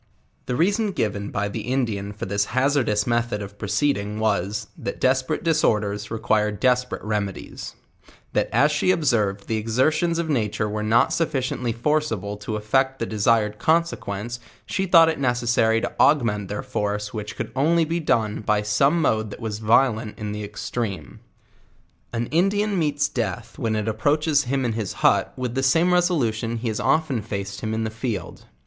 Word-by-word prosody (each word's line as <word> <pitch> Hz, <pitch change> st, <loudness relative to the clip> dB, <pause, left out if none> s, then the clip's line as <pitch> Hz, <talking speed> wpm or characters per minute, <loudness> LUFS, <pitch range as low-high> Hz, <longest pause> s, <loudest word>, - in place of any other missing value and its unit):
The 125 Hz, -, -1 dB
reason 200 Hz, -, +1 dB
given 100 Hz, -, -2 dB
by 100 Hz, 0 st, -1 dB
the 100 Hz, -, -4 dB
Indian 115 Hz, -5 st, -2 dB
for 105 Hz, -, -6 dB
this 100 Hz, +1 st, 0 dB
hazardous 130 Hz, -6 st, +2 dB
method 120 Hz, -2 st, 0 dB
of 100 Hz, +1 st, -11 dB
proceeding, 105 Hz, -2 st, 0 dB
was, 105 Hz, -1 st, 0 dB
that -, -, -5 dB
desperate 130 Hz, +3 st, +1 dB
disorders 105 Hz, -10 st, +1 dB
require 110 Hz, -1 st, +1 dB
desper 125 Hz, +3 st, +1 dB
ate -, -, -17 dB
remedies; 105 Hz, -2 st, -4 dB, 0.6 s
that -, -, +1 dB
as 145 Hz, +2 st, +4 dB
she 150 Hz, +4 st, +1 dB
observed 110 Hz, -, +1 dB
the 110 Hz, -, 0 dB
exertions 155 Hz, +10 st, +1 dB
of 170 Hz, -1 st, -1 dB
nature 105 Hz, -7 st, 0 dB
were 105 Hz, 0 st, -3 dB
not 110 Hz, +3 st, +3 dB
sufficiently 130 Hz, -6 st, -1 dB
forcible 115 Hz, -5 st, -1 dB
to 105 Hz, +1 st, -5 dB
effect 130 Hz, +5 st, +1 dB
the 115 Hz, -, -2 dB
desired 105 Hz, -1 st, +1 dB
conse 165 Hz, +1 st, +2 dB
quence, 105 Hz, +4 st, -5 dB, 0.3 s
she 190 Hz, -1 st, -2 dB
thought 165 Hz, -2 st, +7 dB
it 160 Hz, -, -1 dB
necessary 120 Hz, -3 st, +2 dB
to -, -, -3 dB
augment 110 Hz, -9 st, +3 dB
their 105 Hz, +7 st, -4 dB
force 105 Hz, -5 st, -3 dB
which 105 Hz, -1 st, -5 dB
could -, -, -5 dB
only 160 Hz, +5 st, +3 dB
be 165 Hz, +2 st, -1 dB
done 110 Hz, -9 st, 0 dB
by 105 Hz, 0 st, +1 dB
some 135 Hz, +11 st, +2 dB
mode 110 Hz, -5 st, +1 dB
that -, -, -9 dB
was 110 Hz, -3 st, -4 dB
violent 110 Hz, 0 st, +2 dB
in 105 Hz, -1 st, -4 dB
the 105 Hz, 0 st, -4 dB
ex 100 Hz, 0 st, -7 dB
treme. 100 Hz, -, -4 dB, 0.9 s
An 120 Hz, 0 st, -2 dB
Indian 195 Hz, +4 st, +2 dB
meets 145 Hz, -2 st, +1 dB
death 115 Hz, 0 st, -4 dB
when 115 Hz, -3 st, 0 dB
it 105 Hz, 0 st, -2 dB
approaches 145 Hz, +7 st, +1 dB
him 135 Hz, +1 st, 0 dB
in 115 Hz, -, 0 dB
his 110 Hz, -4 st, -3 dB
hut -, -, +4 dB
with 125 Hz, -2 st, -3 dB
the 135 Hz, -, 0 dB
same 165 Hz, +7 st, +3 dB
resolution 120 Hz, -11 st, +1 dB
he 115 Hz, 0 st, -2 dB
has 110 Hz, -, -3 dB
often 155 Hz, -7 st, +1 dB
faced 100 Hz, -1 st, -5 dB
hi 110 Hz, -, -3 dB
Ji 110 Hz, -, -2 dB
in 110 Hz, -, -1 dB
the 110 Hz, -, -3 dB
field. 110 Hz, -5 st, -5 dB
115 Hz, 180 wpm, -23 LUFS, 105-140 Hz, 0.9 s, thought